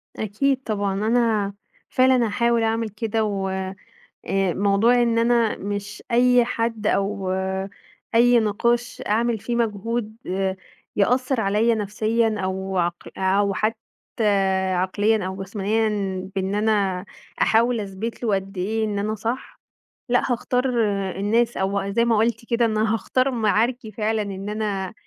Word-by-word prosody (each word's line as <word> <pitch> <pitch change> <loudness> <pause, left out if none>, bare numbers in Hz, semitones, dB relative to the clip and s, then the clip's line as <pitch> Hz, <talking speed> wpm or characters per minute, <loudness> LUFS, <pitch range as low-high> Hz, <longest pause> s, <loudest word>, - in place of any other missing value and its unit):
أكيد 260 +6 0
طبعًا، 205 -3 -1
أنا 225 -4 +2 0.4
فعلًا 255 -1 +4
هاحاول 235 +2 +1
أعمل 225 0 0
كده، 220 +2 -1
و 200 -2 -1
آآ 190 0 -4 0.8
موضوع 205 +5 +3
إن 230 -1 +2
أنا 230 -1 +2
مش 205 +1 -5
أي 245 0 +5
حد 230 -2 -2
أو 200 -2 0 0.8
أي 240 +1 +6
نقاش 235 +3 0
أعمل 230 +2 +1
فيه 235 +3 -3
مجهود 225 0 -2 0.8
يأثر 250 +4 +2
عليّا 215 +3 +2
نفسيًا 220 +2 0
أو 190 0 -2
عقل 175 0 -2
أو 195 +1 +2
حتى 215 +3 0 1.0
عقليًا 205 +3 +1
أو 190 +1 -5
جسمانيًا 210 +3 0 0.5
بإن 190 +1 -1
أنا 205 -3 +1 0.4
أحاول 230 +1 +3
أثبْت 205 +4 -5
له 220 -4 +2
قد 195 0 -4
إيه 220 +4 0
إن 210 -2 -2
أنا 210 +2 -1
صح. 230 +4 -5 0.5
لأ، 245 +1 +2
هاختار 250 +1 0 0.5
الناس 230 +4 +1
أو 195 +1 -1
زَي 235 +3 +2
ما 230 -2 +3
قُلتِ 225 +1 0
كده 235 -1 +3
إن 220 -1 0
أنا 215 0 +2
هاختار 255 +4 +1
معاركي 230 0 0
فعلًا 215 +1 -1
إن 200 0 -5
أنا 210 -2 -2
220 Hz, 135 wpm, -23 LUFS, 200-235 Hz, 1.0 s, أي